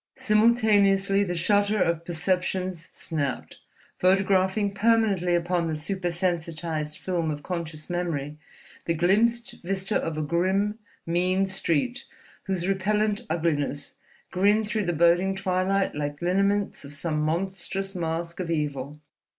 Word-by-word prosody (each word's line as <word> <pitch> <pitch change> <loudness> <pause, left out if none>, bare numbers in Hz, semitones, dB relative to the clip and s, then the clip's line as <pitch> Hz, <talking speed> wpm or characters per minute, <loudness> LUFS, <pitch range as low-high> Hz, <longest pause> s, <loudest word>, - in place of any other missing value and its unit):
Simultaneously 210 -4 +3
the 175 -3 -2
shutter 205 +4 +2
of 170 -2 +1
perceptions 180 0 -1
snapped, 145 -5 -4 0.4
photographing 190 +2 +2
permanently 205 -5 +2
upon 175 0 0
the 160 - -2
super 180 +4 -3
sensitized 165 -3 -2
film 175 -4 -2
of 145 -1 -4
conscious 165 -4 -5
memory 160 -5 -3 0.5
the 165 - 0
glimpsed 220 +8 +1
vista 190 +3 -1
of 165 -1 -1
a 155 - -1
grim, 190 +7 0 0.3
mean 185 +3 +1
street 195 - -1 0.4
whose 185 -2 -1
repellent 205 +2 +1
uglinesses 150 -3 -1 0.4
grinned 205 +3 +3
through 215 -2 -1
the 175 - +1
boding 175 +4 +3
twilight 190 +1 0
like 145 0 -4
lineaments 195 +3 0
of 140 0 -10
some 150 +1 -2
monstrous 190 +4 -2
mask 170 -1 -3
of 180 -2 -3
evil. 150 -2 -2
180 Hz, 125 wpm, -26 LUFS, 165-195 Hz, 0.5 s, Simultaneously